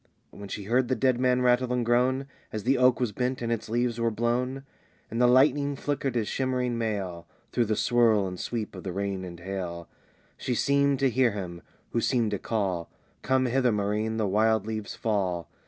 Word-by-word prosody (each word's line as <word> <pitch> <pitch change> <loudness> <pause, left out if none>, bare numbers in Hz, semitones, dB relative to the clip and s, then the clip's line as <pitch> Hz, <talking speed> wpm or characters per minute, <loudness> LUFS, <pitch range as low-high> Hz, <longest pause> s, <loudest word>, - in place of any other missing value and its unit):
When 100 -1 -10
she 105 - -5
heard 120 +5 +2
the 130 - +1
dead 125 +1 +2
man 125 0 +2
rattle 125 0 +3
and 125 -1 0
groan 125 +3 +2 0.3
As 110 -2 -4
the 130 +3 +3
oak 125 -1 +4
was 125 -4 0
bent 125 +4 -2
and 115 - -1
its 115 -2 -2
leaves 120 0 0
were 115 - +3
blown, 125 +4 -1 0.5
And 115 +2 -1
the 125 - +6
lightning 140 +3 +4
flickered 140 -2 -2
his 110 -3 0
shimmering 125 -2 -1
mail, 100 -7 -3 0.2
Through 120 - +2
the 110 0 0
swirl 115 -4 +3
and 90 -1 -5
sweep 115 -3 -4
of 95 - -8
the 95 - -4
rain 100 -1 -2
and 85 -2 -8
hail, 90 -2 -5 0.5
She 125 - -2
seemed 140 +1 +2
to 135 - +4
hear 120 -2 +3
him, 90 -4 -6 0.3
who 115 - 0
seemed 115 -3 +1
to 100 - -2
call, 95 -7 -2 0.3
"Come 130 0 +2
hither, 125 0 +2
Maurine! 105 +2 -1
the 110 - +1
wild 110 +2 +2
leaves 110 -1 -4
fall! 95 -7 -1
115 Hz, 200 wpm, -27 LUFS, 100-125 Hz, 0.5 s, the